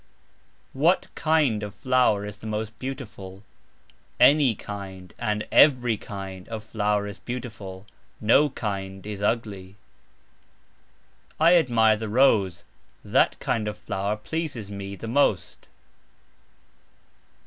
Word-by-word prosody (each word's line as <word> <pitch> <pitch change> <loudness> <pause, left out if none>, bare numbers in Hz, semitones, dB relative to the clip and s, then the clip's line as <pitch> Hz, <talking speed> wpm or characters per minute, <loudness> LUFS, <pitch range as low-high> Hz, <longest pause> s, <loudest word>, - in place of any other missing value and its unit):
"What 160 +7 +2
(kind 150 -9 +2
of)" 105 -1 -6
flower 125 -6 +2
is 105 0 -7
the 110 - -9
most 110 +1 -4
beautiful? 110 -8 -7 0.8
"Any 140 -5 +5
kind" 95 -3 -8
and 105 -2 -2
"every 125 -6 +5
kind" 95 -3 -8
of 110 -2 -5
flower 105 -1 0
is 100 -1 -8
beautiful, 105 -6 -7 0.3
"no 130 +7 +4
kind" 95 -5 -5
is 105 -1 -6
ugly. 100 -3 -2 1.6
I 165 +3 +6
admire 115 -9 +4
the 110 0 -5
rose, 105 -8 +3 0.4
"that - - +2
kind 110 -2 -1
of" 105 - -4
flower 100 +2 -3
pleases 130 -4 -4
me 100 0 -6
the 115 - -8
most. 140 +5 0
105 Hz, 115 wpm, -25 LUFS, 100-125 Hz, 1.6 s, I